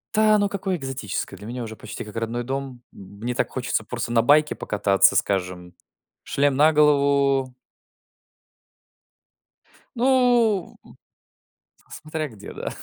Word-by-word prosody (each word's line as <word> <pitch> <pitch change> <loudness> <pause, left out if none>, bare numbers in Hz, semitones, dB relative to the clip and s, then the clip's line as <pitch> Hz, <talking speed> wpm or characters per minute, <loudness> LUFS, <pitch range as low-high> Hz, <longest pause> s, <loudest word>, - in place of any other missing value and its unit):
Та 215 0 +5
оно 205 -1 +2
какое 195 -2 -3
экзотическое, 130 - -5
для 105 - -12
меня 120 +3 -6
уже 110 -1 -7
почти 120 - -8
как 105 - -12
родной 115 +1 -3
дом. 135 -1 -5
М 100 +1 -14
мне 120 +2 -3
так - - 0
хочется 125 -3 -2
просто 120 +1 -4
на 115 - +4
байке 150 +5 +3
покататься, 100 -2 +2
скажем, 90 -2 -2 0.5
шлем 140 -1 +1
на 155 +3 +5
голову. 140 -3 +2 2.4
Ну, 240 -5 +2 0.9
в - - -31
с - - -7
смотря 155 0 -4
где, 105 -3 -11
да. - - -5
135 Hz, 135 wpm, -23 LUFS, 110-155 Hz, 2.4 s, Та